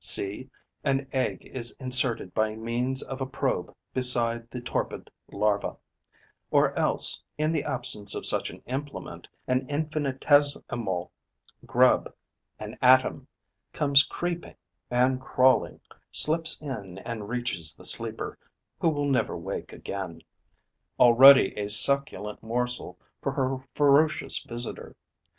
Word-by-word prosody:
See, 105 +7 +1 0.3
an 135 -1 0
egg 130 -1 -2
is 120 -2 -1
inserted 125 -6 0
by 110 0 0
means 120 +4 -2
of 135 0 -7
a 130 - -2
probe 130 - -2 0.2
beside 120 -2 +2
the 125 - -6
torpid 120 - -4 0.2
larva; 100 0 -1 0.7
or - - +3
else, - - +3 0.2
in 155 +1 0
the 155 -3 -1
absence 120 -7 -1
of - - -5
such - - +2
an - - -13
implement, 140 +3 -6 0.2
an 130 0 -1
infinitesimal 145 - 0 0.6
grub, - - +3 0.5
an 105 +3 -9
atom, 130 +1 +4 0.5
comes 140 -1 +5
creeping 175 +1 -5 0.3
and 130 +1 +1
crawling, 130 0 +2 0.3
slips 160 +1 +1
in 110 -11 -7
and 110 0 -7
reaches 120 -10 -1
the - - -11
sleeper, - - 0 0.4
who 165 - +2
will 145 -2 -1
never 135 -3 0
wake - - -6
again, 95 -4 -7 0.8
already 125 -1 +8
a 105 -1 -4
succulent 105 -2 +3
morsel 125 +2 -3 0.2
for - - -2
her 130 0 -1 0.2
ferocious 150 +2 +2
visitor. 120 0 -4
125 Hz, 120 wpm, -26 LUFS, 115-140 Hz, 0.8 s, already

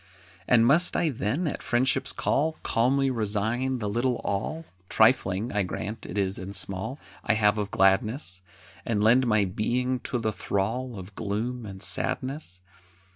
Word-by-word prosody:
And 115 -2 +5
must 155 +8 +4
I 165 - +2
then, 135 - -1
at 150 - -3
Friendship's 125 +1 +1
call, 155 +3 0
Calmly 135 +3 +2
resign 115 +3 -1
the 105 -3 -3
little 120 +4 0
all 155 +12 -2 0.2
(Trifling, 95 +5 +3
I 105 - +2
grant, 105 +4 -5
it - - -6
is 95 -1 0
and 95 +2 -6
small) 95 +7 -4 0.3
I - - +2
have 105 -1 +3
of 105 -1 -2
gladness, 95 +1 +1 0.4
And 105 -3 0
lend 125 +3 +5
my 110 -3 +3
being 125 +7 -1
to 125 - -3
the 110 -2 -1
thrall 115 +6 -2
Of 95 +2 -9
gloom 110 +3 -3
and 95 -1 -7
sadness? 130 - -2
110 Hz, 155 wpm, -27 LUFS, 100-130 Hz, 0.4 s, And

